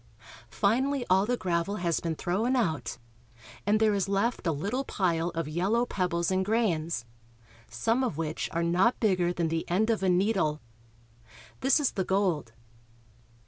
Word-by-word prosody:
Finally 255 +6 +1
all 190 +2 +4
the 245 0 0
gravel 180 +1 -1
has 175 -4 0
been 165 -1 -3
thrown 215 +11 0
out, 160 - -1 0.7
and 210 +1 +3
there 220 -1 +3
is 195 -1 -1
left 200 +1 0
a - - +3
little 200 - -2
pile 170 -8 0
of 165 -2 -2
yellow 195 +10 +1
pebbles 180 -5 -1
and 190 0 +1
grains, 170 - 0 0.6
some 225 - 0
of 235 - -2
which 160 -1 -3
are 170 0 -1
not 180 +8 +2
bigger 185 -5 +2
than 170 -2 -1
the 165 0 -1
end 215 +6 +2
of 220 - -1
a 190 - +2
needle. 180 -5 +1 1.0
This 270 +3 +3
is 290 - +1
the 190 - -1
gold. 180 - 0
185 Hz, 160 wpm, -28 LUFS, 170-220 Hz, 1.0 s, all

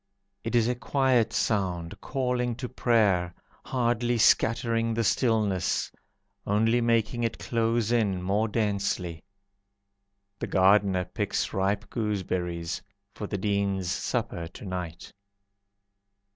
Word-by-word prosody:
It 115 +2 -2
is 115 -1 +4
a 125 - +2
quiet 130 -2 +2
sound, 90 -6 -1
Calling 125 -2 -1
to 125 +1 -5
prayer, 105 -8 +2 0.3
Hardly 120 -1 0
scattering 115 0 +3
the 115 - +1
stillness, 110 -5 +1 0.6
Only 115 +4 +3
making 115 0 +1
it 115 - -1
close 115 -1 0
in 105 -6 +2
more 100 +4 +1
densely. 100 -6 -1 1.2
The - - -3
gardener 95 -1 +3
picks - - -2
ripe 100 +3 0
gooseberries 90 -6 -2 0.3
For 105 - -5
the 100 - -3
Dean's 100 -2 0
supper 85 -3 -2
to 90 - -11
night. 90 -3 -6
105 Hz, 110 wpm, -27 LUFS, 95-115 Hz, 1.2 s, is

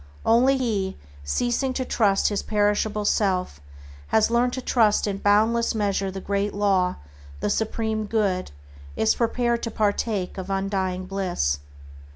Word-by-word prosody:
Only 255 +4 +4
he 215 -7 -1
who, - - -20 0.3
ceasing 245 - 0
to 260 0 -2
trust 200 -6 +2
his 205 -2 -1
perishable 210 0 0
self, 185 - 0 0.5
has 220 +1 +2
learned 245 +1 +2
to - - -3
trust 220 -5 +3
in 200 -2 -2
boundless 220 +4 +2
measure 200 -2 0
the 190 0 -6
Great 200 +1 -2
Law, 195 -3 +2 0.4
the 100 - -1
Supreme 220 0 -1
Good, 200 -4 0 0.5
is 110 - +3
prepared 235 0 0
to 230 - -3
partake 205 -3 -1
of 190 +1 -6
undying 195 -1 -1
bliss. 180 - -1
205 Hz, 145 wpm, -24 LUFS, 195-225 Hz, 0.5 s, Only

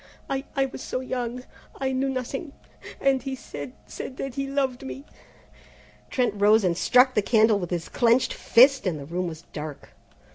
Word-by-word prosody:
"I 270 0 -2
I 270 -1 +3
was 260 -1 -8
so - - -3
young, 250 -1 -4 0.4
I 265 -1 0
knew 265 +1 0
nothing, 265 +3 -4 0.5
and 270 -1 +2
he 265 +1 -4
said 145 - -8
said 105 - -7
that 270 -2 -4
he 275 +1 -3
loved 270 -2 -1
me 270 +1 -7 0.5
" - - -26
Trent 250 -5 +1
rose 210 +2 +5
and 175 -2 +2
struck 250 +7 +4
the 210 - +3
candle 220 0 +4
with 175 -3 -4
his 175 -2 -3
clenched 240 +1 +2
fist, 260 -1 +5
and 170 -4 -1
the 140 - -8
room 175 +4 -2
was 160 -1 -7
dark. 150 -1 -7
250 Hz, 185 wpm, -25 LUFS, 185-270 Hz, 0.5 s, rose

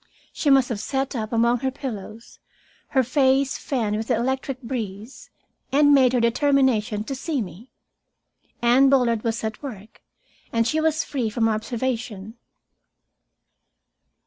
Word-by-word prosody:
She 295 - 0
must 270 -2 +5
have 225 -4 -3
sat 270 +4 -2
up 220 -2 -3
among 235 +1 +2
her 265 +2 -1
pillows, 230 -4 -8 0.5
her 265 - +2
face 265 +2 +2
fanned 220 -6 -1
with 220 +1 -4
the 245 - +2
electric 260 +2 -2
breeze, 225 -1 -6 0.4
and 290 +1 +5
made 260 -3 +5
her 250 - +3
determination 235 -3 +2
to 270 - -5
see 275 +2 -3
me. 210 +3 -7 0.9
Anne 255 +3 +5
Bullard 240 -5 +2
was 230 -1 -2
at 220 0 -4
work, 220 -6 -9 0.5
and 230 0 +1
she 315 +6 0
was 315 0 +1
free 255 -6 -2
from 225 +1 +1
observation. 225 -2 -3
245 Hz, 140 wpm, -23 LUFS, 220-270 Hz, 0.9 s, must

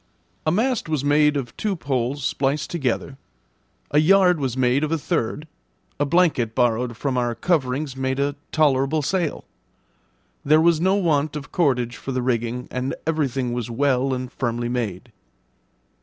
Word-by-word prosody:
A - - +4
mast 230 0 0
was 155 -4 -1
made 150 0 +4
of 125 -4 -5
two 210 -2 -1
poles 135 -3 -2
spliced 140 +3 -1
together, 135 -3 -2 0.7
a 145 - +4
yard 180 +1 +5
was 130 -3 -2
made 130 +3 +2
of 155 - -1
a 165 - +2
third, 145 +1 -2 0.5
a 145 - +1
blanket 145 -9 +2
borrowed 120 -1 +1
from 130 -2 -1
our 120 -1 -1
coverings 135 -1 -1
made 130 0 -2
a 140 +1 +1 0.2
tolerable 145 0 +2
sail. 175 0 -1 1.0
There 155 +2 +5
was 165 -1 +3
no 190 +2 +3
want 155 -6 +1
of 145 -1 -7
cordage 125 -8 +1
for 135 - -5
the 130 -1 -1
rigging, 120 0 -1
and 130 +1 -2
everything 135 -6 -1
was 120 -1 -3
well 135 +2 +1
and 130 -1 -3
firmly 120 -1 -2
made. 120 -2 -3
135 Hz, 155 wpm, -23 LUFS, 125-155 Hz, 1.0 s, yard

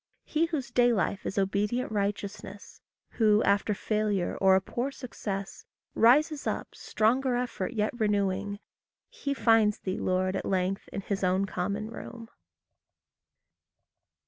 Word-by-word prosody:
He 320 +2 +1
whose 285 -7 -4
day 245 0 +4
life 200 -2 -1
is 195 - -4
obedient 205 +5 0
righteousness, 200 -1 -4 0.3
Who, 215 -2 +3
after 200 +1 +2
failure, 210 -3 -1
or 190 -1 +6
a - - +5
poor 240 +7 -3
success, 205 -7 -6 0.3
Rises 290 +6 +4
up, - - -3
stronger 250 +4 +1
effort 245 -4 -2
yet 215 -2 0
renewing 205 -3 0 0.5
He 375 - -3
finds 225 -4 +4
thee, 185 -1 -4
Lord, 185 +1 0
at - - -2
length, 190 0 -1
in 200 - -5
his 200 0 -3
own 185 +2 +2
common 200 +4 -3
room. 230 0 -9
210 Hz, 130 wpm, -28 LUFS, 195-240 Hz, 0.5 s, or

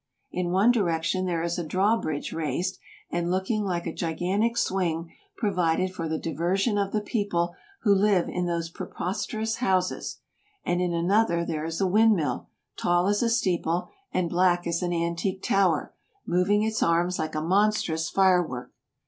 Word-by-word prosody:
In 180 -1 -2
one 195 +7 +4
direction 185 -3 0
there 170 -2 -1
is 170 +1 -1
a - - -2
draw 190 +7 +2
bridge 155 -9 -3
raised, 165 +4 -2 0.3
and 175 0 -1
looking 190 +4 0
like 175 -3 -2
a 165 - -3
gigantic 190 +8 -1
swing 170 -7 -1 0.2
provided 185 -3 +1
for 165 -3 -4
the 160 - -1
diversion 175 - 0
of 200 -1 -1
the 215 - 0
people 200 -6 -1 0.3
who 205 - +5
live 195 -2 +3
in 180 0 -2
those 170 -1 -2
preposterous 220 +6 -3
houses; 185 -6 0 0.5
and 175 0 +1
in 180 -1 0
another 170 0 +2
there 155 -2 -3
is 165 0 -3
a 195 - +2
wind 215 +4 +5
mill, 145 -8 -2 0.3
tall 175 0 +2
as 205 +1 +2
a 235 - +2
steeple 180 -6 0 0.2
and 175 -2 -1
black 175 0 +3
as 170 +1 -1
an 175 -1 -1
antique 170 +3 -1
tower, 185 -6 +2 0.3
moving 190 +4 +2
its 220 0 -1
arms 175 +2 +2
like 155 -1 -3
a - - +1
monstrous 180 -2 +1
fire 190 -2 +4
work. 125 -7 -6
180 Hz, 170 wpm, -26 LUFS, 170-200 Hz, 0.5 s, who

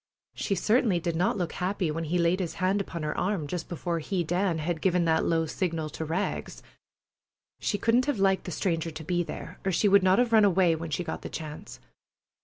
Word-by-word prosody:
She 195 - -1
certainly 210 -1 +2
did 170 0 -2
not 200 +8 +1
look 175 -3 -2
happy 180 -2 -1
when 165 +2 -3
he 160 +3 -2
had 175 - +3
laid 170 +3 +2
his 175 -4 -3
hand 190 +2 +1
upon 170 -4 -6
her 150 - -2
arm, 185 -5 -1
just 165 +3 -5
before 170 0 -2
he, 180 +2 -1
Dan, 175 +1 0
had 160 +1 -2
given 180 -2 +2
that 160 -1 +2
low 165 -1 +2
signal 160 -2 -2
to - - -5
Rags. 165 +6 -3 1.0
She 205 - -1
couldn't 235 +5 +2
have 290 -5 0
liked 195 -1 +2
the 180 - -4
stranger 165 -1 -1
to 160 0 -8
be 175 +2 0
there, 170 +1 -7
or 190 - 0
she 190 +4 +2
would 200 0 +6
not 185 +1 +4
have 245 -2 +2
run 220 -1 +7
away 185 -4 +4
when 165 0 -6
she 155 +4 -2
got 165 - -5
the - - -6
chance. 155 -2 -7
175 Hz, 225 wpm, -28 LUFS, 165-195 Hz, 1.0 s, run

